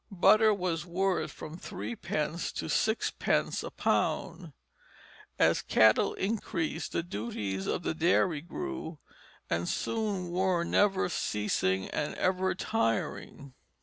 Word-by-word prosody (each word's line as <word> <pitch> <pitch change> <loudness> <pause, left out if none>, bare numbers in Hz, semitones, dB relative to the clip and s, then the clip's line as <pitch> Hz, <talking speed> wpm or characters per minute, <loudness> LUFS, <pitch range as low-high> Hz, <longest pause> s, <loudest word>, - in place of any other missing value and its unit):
Butter 215 +3 +5
was 180 -5 -1
worth 185 +2 0
from 155 +3 -9
threepence 150 - -3
to - - -4
sixpence 220 +1 +1
a - - -5
pound. 170 -3 -1 0.9
As - - +3
cattle 110 -1 +4
increased 185 -6 -2
the 170 - 0
duties 105 - -4
of - - -1
the - - -1
dairy 165 -1 +2
grew, 255 - -5 0.5
and 85 +1 -1
soon 205 -6 -2
were 180 -1 +1
never 195 +2 +2
ceasing 105 - 0
and 150 - -2
ever 185 0 +1
tiring. 140 - -2
170 Hz, 115 wpm, -30 LUFS, 145-190 Hz, 0.9 s, Butter